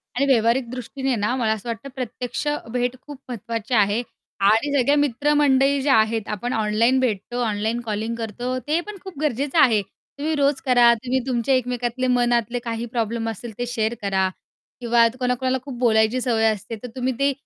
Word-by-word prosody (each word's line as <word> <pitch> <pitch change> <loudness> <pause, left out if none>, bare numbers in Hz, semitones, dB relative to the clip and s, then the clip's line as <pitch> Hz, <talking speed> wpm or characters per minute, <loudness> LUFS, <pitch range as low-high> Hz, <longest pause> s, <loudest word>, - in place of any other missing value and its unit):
आणि 275 +3 +2
व्यावहारिक 235 -1 +2
दृष्टीने 255 +1 -3
ना 210 +3 0
मला 230 -4 +1
असं 220 +2 -7
वाटतं, 230 +4 -5
प्रत्यक्ष 250 +2 -4 0.2
भेट 245 +1 -1
खूप 290 -2 -11
महत्त्वाची 230 0 -4
आहे. 210 0 +3 0.4
आणि 220 +8 +3
सगळ्या 280 +3 +3
मित्रमंडळी 280 0 +3
ज्या 270 0 +3
आहेत 220 0 +1
आपण 225 +4 -3
ऑनलाईन 225 +4 +2
भेटतो 240 0 -1
ऑनलाईन 220 +1 -1
कॉलिंग 225 0 -3
करतो, 235 +3 -4
ते 300 +6 0
पण 420 -1 -7
खूप 380 -7 -9
गरजेचं 285 +1 -1
आहे. 225 -8 +5 0.4
तुम्ही 310 +2 -1
रोज 280 -2 +1
करा, 245 -2 +6
तुम्ही 250 +3 -1
तुमच्या 255 +1 +1
एकमेकातले 250 0 -1
मनातले 240 -1 +1
काही 230 0 -3
प्रॉब्लेम 230 0 -1
असतील 225 +2 -7
ते 245 - -2
शेअर 225 -1 -1
करा. 190 -2 +1 0.5
किंवा 235 -1 +4
कोणाकोणाला 255 +1 0
खूप 270 -3 -7
बोलायची 225 0 +3
सवय 230 -3 +1
असते, 215 0 -1
तर - - -4
तुम्ही 260 0 -1
ते 280 0 +3
245 Hz, 170 wpm, -22 LUFS, 225-260 Hz, 0.5 s, करा